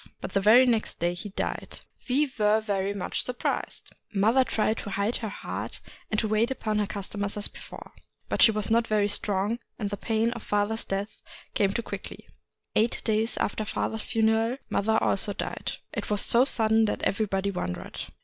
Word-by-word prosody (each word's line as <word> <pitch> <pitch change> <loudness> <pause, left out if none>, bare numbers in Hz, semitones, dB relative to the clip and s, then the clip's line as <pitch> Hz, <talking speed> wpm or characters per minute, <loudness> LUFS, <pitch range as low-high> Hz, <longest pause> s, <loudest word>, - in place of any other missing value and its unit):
But - - -6
the 195 - +2
very 225 +6 +7
next 230 -3 0
day 175 +1 0
he 175 +4 -6
died. 195 - -4 0.3
We 280 +4 +4
were 210 +1 +4
very 200 -2 -1
much 200 -2 -2
surprised. 250 -1 -3 0.2
Mother 220 +6 +4
tried 225 -2 0
to - - -6
hide 200 +4 0
her 220 - -4
heart, - - -5 0.3
and 215 - +1
to 220 - 0
wait 215 +3 +2
upon 215 -5 -1
her 205 - +1
customers 200 0 -3
as 205 - 0
before. - - -11 0.4
But - - 0
she - - +10
was 215 -1 -1
not 230 0 +3
very 210 -1 +2
strong, 205 +2 0 0.2
and 205 -3 -3
the 205 - -2
pain 225 +2 +1
of 235 -2 -6
father's 205 +2 0
death 195 +2 -4 0.3
came 195 -2 +2
too 235 +3 -2
quickly. - - -7 0.5
Eight 225 +2 +2
days 220 +1 +1
after 215 - -1
father's 220 +1 -2
funeral 225 +3 +1
mother 220 +2 +2
also 200 +1 0
died. - - -4 0.2
It - - -4
was 210 -1 +3
so 240 +2 +5
sudden 220 -3 +3
that 210 - -2
everybody 200 -1 0
wondered. 90 - -4
215 Hz, 185 wpm, -27 LUFS, 200-225 Hz, 0.5 s, she